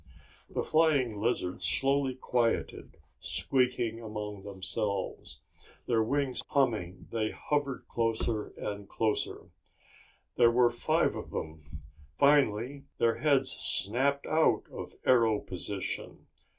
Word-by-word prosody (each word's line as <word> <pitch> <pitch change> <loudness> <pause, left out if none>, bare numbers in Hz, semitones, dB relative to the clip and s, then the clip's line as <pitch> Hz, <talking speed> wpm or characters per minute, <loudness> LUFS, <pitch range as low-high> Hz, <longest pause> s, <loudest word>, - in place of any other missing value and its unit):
The - - -2
flying 145 -9 +2
lizards 105 -5 -1
slowly 135 0 +2
quieted, 120 -2 -1 0.2
squeaking 125 -3 0
among 105 -2 -6
themselves. 100 0 -4 0.4
Their 115 -2 +2
wings 135 +3 0
humming, 110 - 0
they 110 -2 0
hovered 145 0 -2
closer 115 -1 -1
and 100 -1 -5
closer. 110 -2 -2 0.9
There 120 -1 +7
were 120 0 +4
five 120 - +1
of - - -7
them. 75 -1 -7 0.4
Finally 140 -1 +3
their 115 -1 +2
heads 140 -3 +3
snapped 110 - 0
out 160 0 +3
of - - -8
arrow 115 -4 +4
position. 95 +1 -5
115 Hz, 105 wpm, -30 LUFS, 105-135 Hz, 0.9 s, There